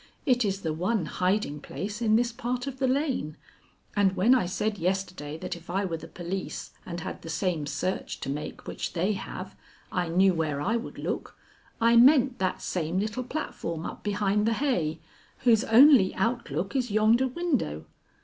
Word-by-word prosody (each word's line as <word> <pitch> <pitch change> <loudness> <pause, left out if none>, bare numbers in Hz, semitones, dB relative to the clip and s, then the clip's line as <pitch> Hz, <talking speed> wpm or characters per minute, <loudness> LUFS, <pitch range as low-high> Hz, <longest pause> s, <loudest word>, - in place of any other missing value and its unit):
It 250 -4 +3
is 195 -2 -1
the 160 -3 -1
one 185 +3 0
hiding 180 -3 0
place 205 +8 -6
in 220 -2 +3
this 235 +1 +2
part 245 +1 -3
of 270 -1 -6
the 265 - +2
lane; 260 - -1 0.6
and 195 -2 +3
when 205 +7 +5
I 245 -9 +2
said 205 +3 -2
yesterday 180 -4 -2
that - - -5
if 170 0 -14
I 195 +3 0
were 165 -3 -2
the 165 - -10
police 180 +3 -5 0.2
and 175 -1 -5
had - - -6
the 165 - -8
same 165 -2 -1
search 185 +5 -3
to - - -4
make 150 +2 -6
which - - -4
they 185 +5 +1
have, 195 - -7 0.4
I 180 -1 0
knew 185 +3 +4
where 155 -4 -1
I 205 +10 0
would 235 - -4
look, - - -4 0.4
I 230 0 +5
meant 260 0 +6
that 185 -1 -1
same 170 0 -2
little 215 +5 -1
platform 175 - -4
up - - -6
behind 205 0 +1
the 230 - +3
hay, 180 - 0 0.5
whose 235 -3 +5
only 250 -4 +7
outlook 195 - -1
is 250 -2 0
yonder 215 +5 +4
window. 255 - -1
195 Hz, 180 wpm, -27 LUFS, 170-240 Hz, 0.6 s, only